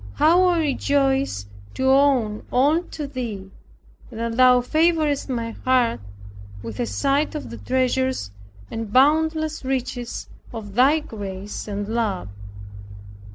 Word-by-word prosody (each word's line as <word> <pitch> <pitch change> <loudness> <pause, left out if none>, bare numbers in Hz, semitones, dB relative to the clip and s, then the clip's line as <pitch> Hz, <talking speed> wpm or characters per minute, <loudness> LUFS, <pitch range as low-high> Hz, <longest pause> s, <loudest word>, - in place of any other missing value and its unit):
How 345 +4 +5
I 355 -1 +3
rejoice 275 - 0 0.3
to 260 - -3
owe 265 -6 +3
all 290 +7 +3
to 310 -4 -7
Thee, 225 -8 -6 0.6
and 225 - -9
that 230 0 -2
Thou 250 0 +6
favorest 310 0 +1
my 230 -3 -2
heart 250 - +1 0.6
with 115 -2 -7
a 120 - 0
sight 275 - 0
of 300 - -6
the - - -7
treasures 260 - 0 0.4
and 225 -2 -5
boundless 315 +4 +2
riches 255 -2 -3 0.2
of 215 -4 -8
Thy 275 +7 +4
grace 205 -7 -7
and 205 -1 -4
love! 215 - -2
255 Hz, 125 wpm, -22 LUFS, 220-285 Hz, 0.6 s, Thou